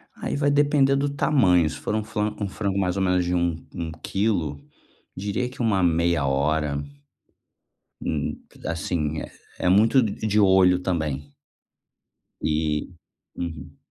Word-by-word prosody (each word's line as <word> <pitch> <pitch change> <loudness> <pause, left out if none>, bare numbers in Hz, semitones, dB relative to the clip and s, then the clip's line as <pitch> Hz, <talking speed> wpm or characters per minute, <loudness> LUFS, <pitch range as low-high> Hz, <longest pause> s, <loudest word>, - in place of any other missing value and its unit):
Aí - - -3
vai 145 0 +2
depender 145 -1 +3
do 140 +1 +1
tamanho, 95 - +3
se - - -7
for - - -3
um 110 - 0
flan 105 0 -2
um 100 - -1
frango 100 -1 -2
mais 90 -1 0
ou 95 - +1
menos 90 -1 +2
de 90 +1 0
um 85 -1 +1 0.2
um 85 -1 -4
quilo, 95 -8 0 0.6
diria 100 +6 -2
que 125 - -8
uma 105 -5 +2
meia 85 -2 +2
hora. 70 +1 0 1.2
Hum, - - -2 0.3
assim, 80 -2 -2
é - - -8 0.3
é 90 - +2
muito 110 +7 +5
d 110 -4 -1
de 105 0 +2
olho 95 -2 +5
também. 75 -6 -3 1.1
E, 75 -1 0 0.5
uhum. 80 -5 -6
90 Hz, 145 wpm, -24 LUFS, 80-105 Hz, 1.2 s, muito